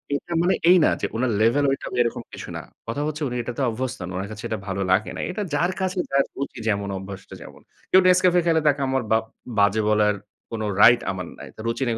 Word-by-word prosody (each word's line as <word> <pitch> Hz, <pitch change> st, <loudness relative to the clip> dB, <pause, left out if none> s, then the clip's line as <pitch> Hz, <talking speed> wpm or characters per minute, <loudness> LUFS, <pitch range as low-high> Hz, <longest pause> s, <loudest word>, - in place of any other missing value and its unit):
এটা 170 Hz, +4 st, -5 dB
মানে 180 Hz, -, +3 dB
এই 185 Hz, -, +8 dB
না -, -, +5 dB
যে -, -, 0 dB
উনার 120 Hz, +1 st, 0 dB
লেভেল 120 Hz, +6 st, +3 dB
ওইটা 135 Hz, -, -3 dB
এরকম 120 Hz, -1 st, -1 dB
কিছু -, -, -8 dB
না। -, -, -5 dB, 0.3 s
কথা 115 Hz, +5 st, -2 dB
হচ্ছে 155 Hz, 0 st, -4 dB
উনি 125 Hz, -, -4 dB
এটাতে 120 Hz, +3 st, -4 dB
অভ্যস্ত 120 Hz, +2 st, -3 dB
নন, 85 Hz, -, -5 dB
ওনার 95 Hz, +2 st, -4 dB
কাছে 110 Hz, -, -8 dB
এটা 110 Hz, -, -2 dB
ভালো 100 Hz, 0 st, -2 dB
লাগে 95 Hz, +3 st, +2 dB
নাই। -, -, -2 dB
এটা 210 Hz, +3 st, -3 dB
যার 175 Hz, +5 st, +1 dB
কাছে 185 Hz, 0 st, -1 dB
যার 140 Hz, 0 st, +4 dB
রুচি 140 Hz, -2 st, -5 dB
যেমন, 100 Hz, -2 st, 0 dB
অভ্যাসটা 95 Hz, 0 st, -9 dB
যেমন। -, -, -12 dB, 0.3 s
কেউ 185 Hz, -, +7 dB
Nescafe 180 Hz, -1 st, +5 dB
খেলে 165 Hz, -1 st, +3 dB
তাকে 140 Hz, -1 st, +3 dB
আমার 130 Hz, -1 st, 0 dB
বাপ 110 Hz, 0 st, +3 dB, 0.4 s
বাজে 100 Hz, +2 st, +3 dB
বলার 105 Hz, -1 st, +3 dB, 0.4 s
কোন 115 Hz, -1 st, -4 dB, 0.2 s
রাইট 120 Hz, 0 st, +7 dB
আমার 90 Hz, -1 st, -5 dB
নাই। -, -, -9 dB
তো -, -, -20 dB
রুচি 115 Hz, +3 st, -1 dB
নেই 115 Hz, -, 0 dB
120 Hz, 230 wpm, -23 LUFS, 105-145 Hz, 0.4 s, এই